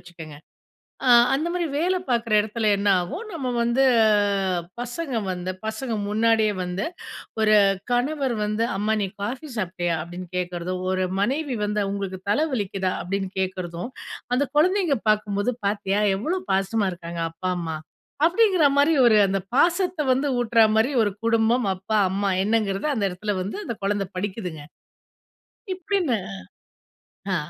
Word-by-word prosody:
வச்சுக்கங்க. 165 -4 -11 0.7
அ - - +5 0.2
அந்தமாரி 340 +5 -1
வேல 360 +5 +1
பார்க்குற 230 -2 0
இடத்துல 215 +1 -1
என்னாவும், 195 - 0
நம்ம 280 -6 -3 0.2
வந்து 235 +3 +2 1.0
பசங்க 250 +2 -4 0.2
வந்து 180 0 -3
பசங்க 230 +2 -3 0.2
முன்னாடியே 220 -1 +2
வந்து 180 +2 -3 0.6
ஒரு 215 0 +4 0.4
கணவர் 265 +1 0
வந்து 210 +2 0
அம்மா, 215 +2 +1
"நீ - - 0 0.2
காஃபி 255 +9 -4
சாப்பிட்டியா? 175 -4 -1
அப்பிடின்னு 175 +1 -8
கேட்கறதும்," 180 0 -3
ஒரு 185 0 0 0.2
மனைவி 270 +4 0
வந்து, 210 0 0
"உங்களுக்கு 195 -2 -4
தலை 255 +10 +3
வலிக்குதா? 195 -4 -1
அப்பிடின்னு 195 +1 -3
கேட்கிறதும்," 185 +2 -4 0.4
அந்த 280 +2 +1
குழந்தைங்க 355 -1 +3
பார்க்கும்போது, 210 +2 0
பார்த்தியா! 200 0 0 0.2
எவ்ளோ 325 - -2
பாசமா 195 +2 +1
இருக்காங்க 170 -1 -6
அப்பா, 185 +3 -3
அம்மா 160 -2 -3 0.5
அப்பிடிங்கிறமாரி 330 -6 +4
ஒரு 225 -2 +6
அந்த 195 +1 0 0.2
பாசத்த 345 +2 +2
வந்து 270 +3 +1
ஊட்றமாரி 225 +1 +3
ஒரு 205 - +1
குடும்பம், 230 +1 +2
அப்பா, 190 +4 -2
அம்மா 200 +1 -1 0.2
என்னங்கிறத 210 +1 0
அந்த 220 -5 -1
இடத்தில 200 +4 -3
வந்து 195 - -5
அந்த - - -4
குழந்த 200 0 0
படிக்குதுங்க. 185 -5 -4 1.1
இப்படின்னு 365 - 0 1.2
ஆ - - +2
215 Hz, 130 wpm, -24 LUFS, 190-265 Hz, 1.2 s, ஒரு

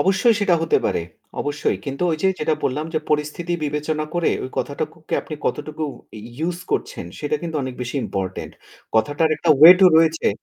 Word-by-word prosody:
অবশ্যই 195 +5 +3
সেটা 200 -4 +3
হতে 165 - +2
পারে। - - 0 0.4
অবশ্যই। 145 +1 -1
কিন্তু 140 +2 -4
ওই 160 - 0
যে 190 - +4
যেটা 155 +1 +1
বললাম 150 +4 -1
যে - - +3
পরিস্থিতি 150 +3 -1
বিবেচনা 150 +1 -2
করে 175 -1 +2
ওই 130 - -6
কথাটুকুকে 155 +3 -4
আপনি 155 - -7
কতটুকু 155 +1 -2 0.3
ই - - -9 0.3
use 175 0 -3
করছেন - - -2
সেটা 150 0 -1
কিন্তু 165 -2 -3
অনেক 130 -1 -5
বেশি 125 +3 -5
ইম্পোর্টেন্ট 95 -1 -4 0.4
কথাটার 145 +8 +2
একটা 160 +2 +1
ওয়েট 175 +4 +10
ও - - +9
রয়েছে। 160 0 +3
155 Hz, 180 wpm, -21 LUFS, 145-165 Hz, 0.4 s, ওয়েট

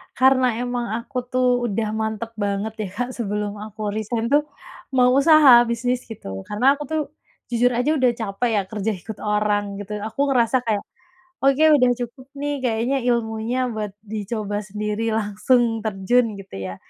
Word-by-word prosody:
Karena 255 -2 +4
emang 245 -1 -2
aku 255 +2 -8
tuh 250 -1 +1
udah 215 0 -1
mantep 220 +1 -3
banget 205 +1 -2
ya, 210 - -2
Kak, 245 +3 -2
sebelum 210 -2 -3
aku 215 0 -5
resign 225 +3 -2
tuh 295 +1 +3 0.5
mau 250 -1 +5
usaha 275 -3 +7
bisnis 245 +2 -1
gitu 95 - -8
karena 260 +7 +3
aku - - -3
tuh 315 +1 -1 0.5
jujur 245 +1 +3
aja 250 +5 +1
udah 255 -4 +3
capek 225 +1 -2
ya - - +1
kerja 210 +2 -2
ikut 195 +4 -9
orang 210 -1 0
gitu 210 +1 -5
aku 220 +4 -7
ngerasa 250 0 +2
kayak 215 -3 0 0.6
"oke 275 +3 +4
udah 250 -2 +4
cukup 245 +2 -7
nih 290 +1 -2
kayaknya 240 +3 0
ilmunya 235 +1 0
buat 215 -2 -4
dicoba 210 -1 -3
sendiri 210 +2 -3
langsung 225 +2 +1
terjun" 220 +3 +1
gitu 195 -1 -11
ya. 95 -1 -5
225 Hz, 160 wpm, -22 LUFS, 210-250 Hz, 0.6 s, usaha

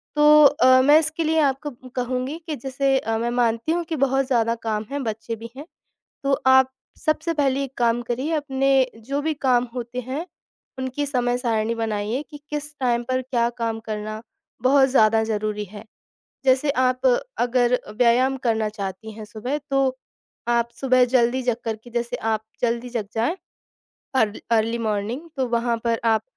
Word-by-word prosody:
तो 300 0 +7
अ, 260 -3 +6
मैं 290 +4 +6
इसके 315 +1 -1
लिए 320 0 +2
आपको 290 0 0 0.2
कहूँगी 255 +4 -2
कि 310 - -2
जैसे 270 0 0
अ, 225 -2 -2
मैं 235 +1 -1
मानती 235 +2 0
हूँ 345 +1 0
कि 320 - -3
बहुत 270 -1 +1
ज़्यादा 230 -3 +2
काम 215 -1 -1
है, 285 - -2
बच्चे 225 0 -4
भी 230 +1 -9
हैं। 290 - -7 0.6
तो 275 0 +1
आप 260 0 +6 0.4
सबसे 315 +2 +1
पहले 275 -2 +1
एक 270 -1 -10
काम 235 0 +2
करिए 250 +6 -2
अपने 275 -3 0 0.3
जो 270 +6 -3
भी 315 +1 0
काम 255 -4 +2
होते 245 0 -4
हैं 265 +7 -5 0.5
उनकी 260 +2 -2
समय 245 -3 0
सारिणी 230 -2 0
बनाइए 220 +2 -2
कि 295 - -9
किस 295 0 -4
टाइम 240 -2 +1
पर 255 +1 -1
क्या 240 -2 0
काम 225 -1 -1
करना 215 0 -5 0.4
बहुत 270 +1 +5
ज़्यादा 225 -4 +4
ज़रूरी 210 -1 -2
है। 205 +2 -11 0.6
जैसे 265 +2 +3
आप 255 - +1 0.3
अगर 245 0 +2 0.2
व्यायाम 255 +2 +3
करना 220 -2 +1
चाहती 210 +1 -6
हैं 215 0 -9
सुबह 230 +7 -4
तो 270 -1 +2 0.5
आप 235 0 +2
सुबह 255 -2 +4
जल्दी 250 +1 +3
जग 245 -2 0
करके 225 +1 -5
जैसे 240 +1 -2 0.2
आप 215 0 -2 0.2
जल्दी 235 +1 0
जग 230 -4 -3
जाएँ 235 +11 0 0.8
अर 220 -5 +3 0.2
अर्ली 230 +1 +2
मॉर्निंग 220 +4 -2
तो 260 - 0
वहाँ 235 0 0
पर 230 -1 +1
आप 225 -1 +3
250 Hz, 170 wpm, -23 LUFS, 230-270 Hz, 0.8 s, तो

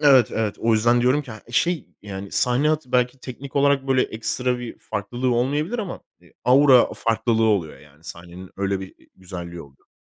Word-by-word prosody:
evet, 135 -5 +5
evet. 110 -2 -1
O 115 0 +2
yüzden 120 +3 +3
diyorum 130 +4 +2
ki, 130 - -12
ha 110 -1 -9
şey, 170 +7 0
yani, 100 -1 -7
sahne 125 +1 +2
hayatı 150 -4 -1
belki 125 +1 +1
teknik 135 +2 -8
olarak 140 -1 +2
böyle 130 -1 +3
ekstra 125 +3 -1
bir 120 -1 -8
farklılığı 120 +4 -2
olmayabilir 150 - 0
ama, 200 -5 -5 0.2
eee, - - -23
aura 130 0 +6
farklılığı 115 0 +1
oluyor, 100 -8 0
yani, 75 +2 -20
sahnenin 85 +2 -10
öyle 100 0 -1
bir 95 - -9
i - - -25
güzelliği 85 -2 -8
oluyor. 70 -1 -21
120 Hz, 185 wpm, -23 LUFS, 100-135 Hz, 0.2 s, aura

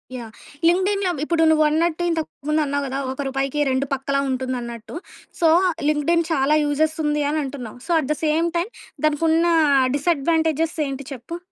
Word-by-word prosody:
Yeah! 235 -3 -7 0.4
లింక్డ్ఇన్‌లో 380 +2 +2
ఇప్పుడు 325 +1 +1
నువ్వన్నట్టు 315 +2 +2
ఇంతకు 325 -2 -1 0.2
ముందన్నావు 290 -2 +1
గదా 270 +1 -3
ఒక 265 - -5
రూపాయికి 270 +2 -2
రెండు 260 +1 0
పక్కలా 275 +1 -1
ఉంటుందన్నట్టు. 250 -3 -4 0.5
సో 330 - +5 0.4
లింక్డ్ఇన్ 305 +3 +2
చాలా 285 0 +2
యూజెస్ 310 +2 +1
ఉంది 295 0 +1
అని 310 - 0
అంటున్నాం. 260 -5 -7
So - - -2
at 270 - -6
the - - -9
same 315 +2 +2
time 355 +7 -2 0.3
దానికున్న 320 +2 +2 0.5
డిసెడ్వాంటేజెస్ 320 +1 +1
ఏంటి 275 0 -6
చెప్పు? 265 +7 -7
300 Hz, 145 wpm, -22 LUFS, 270-325 Hz, 0.5 s, సో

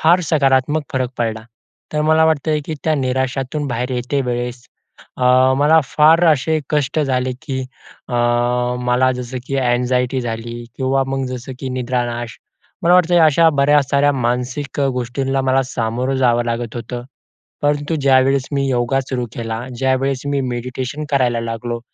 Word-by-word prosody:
फार 175 +3 +4
सकारात्मक 140 0 +2
फरक 130 -2 -1
पडला. 110 -1 -2 0.5
तर 150 - 0
मला 155 +1 +4
वाटतंय, 155 0 +1
की 160 - -3
त्या 155 -1 +2
निराशातून 130 +2 -1
बाहेर 125 +1 -2
येते 125 +3 -1
वेळेस 120 0 -4 0.5
अ, 125 - -1 0.3
मला 155 +2 +5
फार 160 +5 +4
असे 155 +3 0
कष्ट 150 0 0
झाले, 130 -3 0
की 135 -4 -3 0.5
अ, 125 - -4 0.7
मला 125 +1 +2
जसं 125 0 -5
की 135 - -2
एन्जायटी 125 +1 +1
झाली 120 0 -5
किंवा 135 0 +1
मग 135 0 -2
जसं 130 +1 -6
की 135 - -4
निद्रानाश, 120 -2 -3 0.4
मला 175 +2 +5
वाटतं 175 -1 +4
अशा 160 +2 +5
बऱ्या 145 +1 +5
साऱ्या 140 +2 +2
मानसिक 125 +3 -2
गोष्टींना 135 +2 -2
मला 130 0 +2
सामोरं 125 +1 -2
जावं 120 -2 +2
लागत 120 0 -3
होतं. 120 +1 -6 0.6
परंतु 145 +2 0
ज्यावेळेस 135 0 +3
मी 140 -1 0
योगा 125 +1 +1
सुरू 130 -2 -3
केला, 115 -1 -4 0.2
ज्यावेळेस 135 0 0
मी 140 -1 0
मेडिटेशन 130 +4 -4
करायला 125 -4 +1
लागलो, 115 +1 -4
130 Hz, 150 wpm, -18 LUFS, 125-140 Hz, 0.7 s, मला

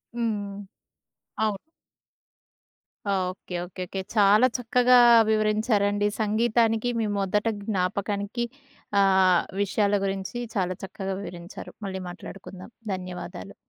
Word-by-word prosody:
హ్మ్. 210 -4 -2 0.9
అవును. 215 -2 +1 1.5
Okay. 185 -2 -2
Okay. 185 +1 -9
Okay. 195 - -5 0.2
చాలా 210 +4 +6
చక్కగా 250 +1 +4 0.3
వివరించారండి. 215 -1 +2
సంగీతానికి 225 +1 +2
మీ 225 - +1
మొదట 200 +2 0 0.2
జ్ఞాపకానికి 200 +3 -1 0.6
ఆహ్, 190 -2 +5 0.2
విషయాల 205 +1 +1
గురించి 195 +4 -3 0.2
చాలా 185 -2 0
చక్కగా 195 0 -4
వివరించారు. 175 -1 -9
మళ్ళీ 190 -1 -4
మాట్లాడుకుందాం. 185 +2 -10 0.2
ధన్యవాదాలు. 180 - -7
200 Hz, 90 wpm, -26 LUFS, 190-215 Hz, 1.5 s, చాలా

